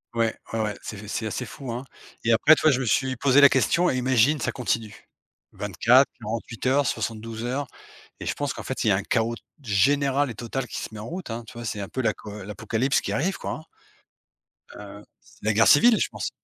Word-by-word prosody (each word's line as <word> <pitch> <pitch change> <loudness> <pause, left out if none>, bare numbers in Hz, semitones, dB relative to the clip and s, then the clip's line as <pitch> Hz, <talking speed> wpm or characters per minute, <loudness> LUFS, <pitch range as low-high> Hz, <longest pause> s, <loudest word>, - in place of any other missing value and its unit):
Ouais, 115 -1 +1 0.2
ouais, 115 - -1
ouais. 105 -1 -2
C'est 105 -1 -7
c'est 110 +1 -3
assez 115 +3 -3
fou, 135 -3 -8
hein? 120 +3 -4 0.4
Et 115 - +2
après, 135 +7 +6
tu - - -4
vois? 155 - +5
Je 130 - +1
me 130 - -2
suis 130 +3 +1
posé 140 +3 +4
la 140 - +9
question: 170 +7 +2
«Et 130 - -1
imagine, 130 +3 +3
ça 105 - -1
continue?» 115 -4 -3 0.5
24, 110 +7 +4
48 115 +2 -5
heures, 140 +2 +3
72 115 0 -4
heures? 135 +2 -2 0.5
Et - - -7
je - - 0
pense 145 -2 -3
qu'en - - -8
fait, 130 - -3
il - - 0
y - - +5
a - - +4
un 95 - -2
chaos, 115 0 0
t - - -15 0.2
général 135 +6 +2
et 115 - -7
total 120 +3 -4
qui - - -6
se - - -5
met 105 - -8
en 110 - -7
route, 175 -8 -6
hein. 115 +1 -5
Tu - - -11
vois, 120 0 -8
c'est 105 - -3
un 100 - -6
peu 130 - -3
l'aco 105 -2 -3
l'apocalypse 115 +6 -1
qui - - -4
arrive 185 +7 0
quoi, - - -4
hein. 155 - -6 1.1
Heu, 105 0 -11 0.2
c'est - - -18
la 110 - +3
guerre 115 +2 +4
civile, 220 +9 +6
je - - +1
pense. - - -4
120 Hz, 235 wpm, -25 LUFS, 110-135 Hz, 1.1 s, la